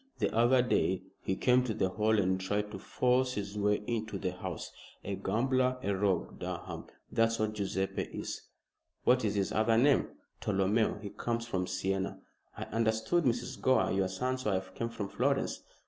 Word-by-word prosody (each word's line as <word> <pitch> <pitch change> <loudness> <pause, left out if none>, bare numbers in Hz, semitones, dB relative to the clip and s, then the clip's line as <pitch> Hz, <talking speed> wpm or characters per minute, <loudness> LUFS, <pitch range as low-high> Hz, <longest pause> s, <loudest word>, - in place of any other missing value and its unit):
The - - 0
other 120 +2 +5
day 95 -6 +1 0.2
he 95 - -1
came 125 +4 +4
to 115 -4 -2
the 95 - +1
Hall 110 +3 +2
and 95 -2 +1
tried 105 +2 -1
to 95 - -6
force 125 +4 +1
his 100 -2 -4
way 105 0 +1
into 110 -3 -2
the 90 -1 -2
house. 90 -2 -6 0.3
A 100 - -3
gambler, 125 +6 +1
a 100 0 +1
rogue, 95 -2 0
Durham - - -5 0.3
that's 115 0 +2
what 110 0 0
Guiseppe 95 -2 -1
is." - - -5 0.6
"What 125 0 +4
is 105 -1 0
his 100 -1 0
other 110 +1 +3
name?" 140 +3 +4 0.3
"Tolomeo! 105 +2 +1
He 100 - -5
comes 115 0 -2
from 95 -6 -2
Siena." 95 +1 -2 0.4
"I - - -3
understood 115 +9 +1
Mrs. 120 -1 -1
Gore 130 0 +3
your 95 0 +2
son's 130 +7 -2
wife 95 -4 -1
came 115 - -3
from 105 -3 -4
Florence." - - 0
105 Hz, 175 wpm, -32 LUFS, 95-120 Hz, 0.6 s, other